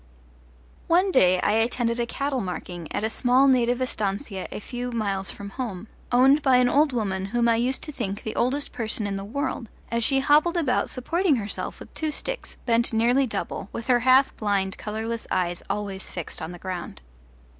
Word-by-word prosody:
One 365 +3 +3
day 185 - +4
I - - +2
attended 235 +2 +1
a 235 - 0
cattle 275 0 -2
marking 175 -3 -6
at - - -2
a - - +2
small 255 +3 +4
native 245 -2 +3
estancia 200 -3 -3
a - - -5
few 245 +3 -5
miles 200 -4 -1
from 200 0 -7
home, 220 -4 -5 0.2
owned 265 +4 +5
by 265 -2 +4
an 250 0 +4
old 290 +3 +3
woman 195 -6 -2
whom 235 +4 +1
I 230 -1 +4
used 250 +3 +1
to 305 - -4
think 205 -7 -4
the 220 - -4
oldest 275 +4 0
person 220 -3 -2
in 200 -1 -2
the 195 - -4
world 235 +1 -3 0.2
as 235 0 +1
she 270 +3 +3
hobbled 305 +5 +4
about 285 -7 +1
supporting 330 +5 +1
herself 210 -4 -4
with - - -12
two 315 - -2
sticks, - - -4
bent 235 0 +2
nearly 245 +4 +3
double, 210 - -4
with 230 - -6
her 250 -2 +4
half 260 +2 +4
blind, 200 -3 0
colourless 220 +2 -4
eyes 175 -1 -1
always 195 -1 -3
fixed 175 -3 -6
on 165 - -5
the 175 - -8
ground. 180 - -6
235 Hz, 190 wpm, -25 LUFS, 200-260 Hz, 0.2 s, owned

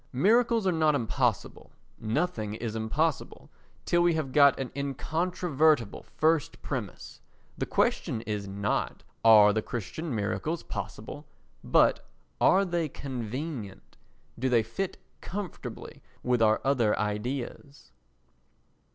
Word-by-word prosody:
Miracles 225 - +3
are 185 - +3
not 155 -3 +2
impossible; 120 -3 -1 0.3
nothing 110 -3 -2
is 110 -1 -4
impossible 140 +8 -2 0.3
till 175 - +2
we 175 -1 +3
have 150 -4 -2
got 140 0 +5
an 130 -2 -4
incontrovertible 150 - 0 0.2
first 160 -1 +1
premise. - - -6 0.3
The - - -3
question 110 - 0
is 105 -3 -4
not 100 +1 -2 0.2
"Are 105 -2 +8
the 110 - 0
Christian 125 - -5
miracles 105 - -2
possible?" - - -7 0.4
but - - +3 0.3
"Are 195 +1 +5
they 170 -3 -1
convenient? 125 - -6 0.4
Do 130 +2 0
they 120 -3 +3
fit 175 - -4 0.2
comfortably 195 -2 -7 0.2
with 125 -2 +1
our 110 -1 +4
other 125 -6 +2
ideas?" 120 +6 -4
135 Hz, 115 wpm, -28 LUFS, 110-160 Hz, 0.4 s, Are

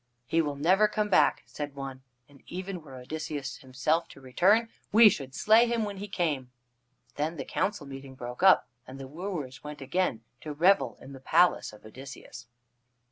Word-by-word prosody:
"He 165 +6 +2
will 145 -2 -2
never 185 +9 +4
come 210 0 -1
back," 190 - +3
said 145 -1 -6
one, 135 -1 -7 0.3
"and 140 -2 -20
even 185 0 -5
were 135 -4 -12
Odysseus 140 +1 -5
himself 135 +6 -1
to - - -14
return, 190 - +2 0.2
we 220 +1 +8
should 135 -7 -5
slay 225 +3 +5
him 235 -1 0
when 200 -1 -6
he 205 +2 -6
came." 150 -10 -2 0.7
Then 155 +3 -2
the 135 - -5
council 195 -5 -2
meeting 135 -1 -9
broke 125 -1 -7
up, 190 0 +6 0.2
and 130 +1 -10
the 135 - -7
wooers 150 -4 -6
went 150 0 -8
again 135 -4 -1 0.2
to 150 - -6
revel 145 - +3
in 135 - -11
the 135 - -10
palace 170 +6 +3
of 105 - -16
Odysseus. 125 0 -11
150 Hz, 180 wpm, -28 LUFS, 135-185 Hz, 0.7 s, we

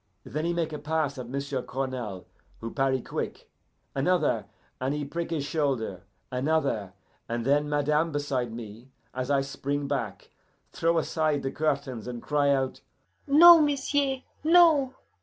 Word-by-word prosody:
Then 155 +4 -3
he 170 - +1
make 165 -2 -1
a 150 - -4
pass 150 -2 -1
at 120 -2 -7
m'sieu' 140 0 -3
Cournal, 125 -8 -4 0.3
who 115 0 -6
parry 135 -2 +1
quick. - - -5 0.4
Another, 155 +3 +1 0.3
and 130 +3 -1
he 150 -1 -3
prick 170 +4 -4
his 155 -4 -2
shoulder. 130 - -2 0.3
Another, 130 -7 0 0.4
and 115 0 -2
then 145 +2 +2
madame 150 +2 +1
beside 140 -5 -2
me, 115 +2 -9 0.2
as 130 +1 -3
I 140 -1 +3
spring 140 +1 -3
back, - - -4 0.4
throw 165 0 +1
aside 155 -2 0
the 135 - -2
curtains, 140 -7 -2
and 120 -1 -5
cry 145 +2 +1
out, 135 -2 0 0.5
'No, 330 +3 +9
m'sieu'! 280 -2 +1 0.2
no! 315 -5 +5
145 Hz, 145 wpm, -27 LUFS, 130-160 Hz, 0.5 s, No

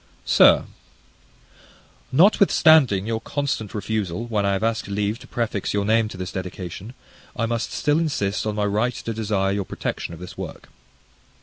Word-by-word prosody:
Sir, - - +6 1.5
Notwithstanding 155 - +5
your 110 0 -2
constant 140 -7 -3
refusal, 105 -1 -2
when 105 -4 0
I 100 - +2
have 95 +2 -2
asked 115 -1 -1
leave 105 +2 -2
to - - -14
prefix 110 -4 -2
your 100 0 0
name 110 +1 +3
to 100 - -9
this 90 -1 -5
dedication, 95 +3 -7 0.4
I 115 - 0
must 115 0 -2
still 150 +1 +1
insist 110 -11 -1
on 105 - -2
my 105 -1 0
right 110 +4 0
to 115 - -5
desire 105 -3 0
your 100 0 -1
protection 85 - -5
of - - -14
this 90 0 -9
work. - - -8
105 Hz, 165 wpm, -23 LUFS, 100-115 Hz, 1.5 s, Sir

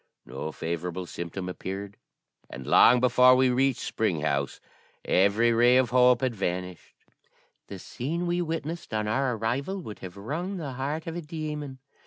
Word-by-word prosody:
No 65 +5 -6
favourable 85 +3 -4
symptom 85 +2 -6
appeared, 95 +2 -6 0.5
and 65 0 -8
long 125 - +6
before 125 +1 +6
we 130 0 +3
reached 130 0 +1
Spring 95 -9 -1
House 70 -2 -1 0.5
every 100 +5 +3
ray 120 +2 +5
of 130 -3 +2
hope 125 -1 +5
had 130 -2 0
vanished. 90 -3 -4 0.7
The 100 - -8
scene 155 - -4
we 175 0 0
witnessed 165 -5 -4
on 105 0 -1
our 130 +3 0
arrival 135 - -2
would 105 - -8
have 95 +1 -9
wrung 165 - -4
the 150 -6 -5
heart 145 +5 -3
of 165 - -5
a 175 - -4
demon. 150 -3 -5
120 Hz, 160 wpm, -27 LUFS, 95-145 Hz, 0.7 s, long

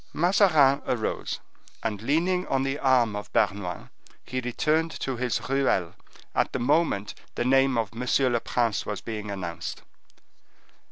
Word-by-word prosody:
Mazarin 160 -6 +4
arose, 115 -3 -2 0.4
and 105 -3 -2
leaning 175 +8 +1
on 135 0 +1
the 135 +2 -2
arm 125 -5 +3
of 105 - -6
Bernouin, 95 -3 -1 0.3
he 130 - -3
returned 155 +7 +1
to 135 - -2
his 125 -1 -1
ruelle 130 -11 +1 0.4
at - - +1
the 130 - -1
moment 135 -6 +1 0.2
the 120 - -1
name 135 0 +4
of 110 -4 -1
M. 125 +2 +1
le 120 - +2
Prince 115 -2 0
was 105 - -4
being 105 -2 -6
announced. 90 -4 -5
125 Hz, 145 wpm, -26 LUFS, 110-140 Hz, 0.4 s, Mazarin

